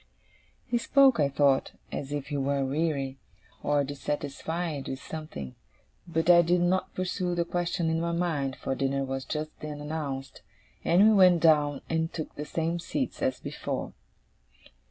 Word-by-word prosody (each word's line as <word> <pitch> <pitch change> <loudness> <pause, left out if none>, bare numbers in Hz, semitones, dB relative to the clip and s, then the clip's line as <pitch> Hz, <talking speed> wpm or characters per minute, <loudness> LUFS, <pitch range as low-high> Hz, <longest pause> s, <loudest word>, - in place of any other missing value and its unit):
He 240 0 0
spoke, 270 - +5
I 145 -2 +3
thought, 140 -1 +2 0.2
as 140 0 -4
if 145 -1 -3
he 145 - -2
were 140 0 0
weary, 140 -2 -1 0.4
or 145 -1 +2
dissatisfied 145 +2 -3
with 135 - -3
something; 145 - -7 0.5
but 165 -1 -1
I 175 -1 +8
did 175 +1 +2
not 185 +2 +1
pursue 180 -1 -1
the 170 0 +1
question 175 0 -1
in 160 0 +1
my 170 0 -1
mind, 160 -6 -1
for 135 - -3
dinner 135 +1 0
was 135 0 -4
just 155 0 -3
then 150 -1 -6
announced, 145 -3 -5 0.4
and 185 +5 +5
we 220 - +6
went 185 -4 +6
down 150 -3 +4
and 160 0 0
took 155 - -5
the 150 - -6
same 165 +2 -1
seats - - -3
as - - 0
before. - - -4
155 Hz, 160 wpm, -28 LUFS, 140-170 Hz, 0.5 s, I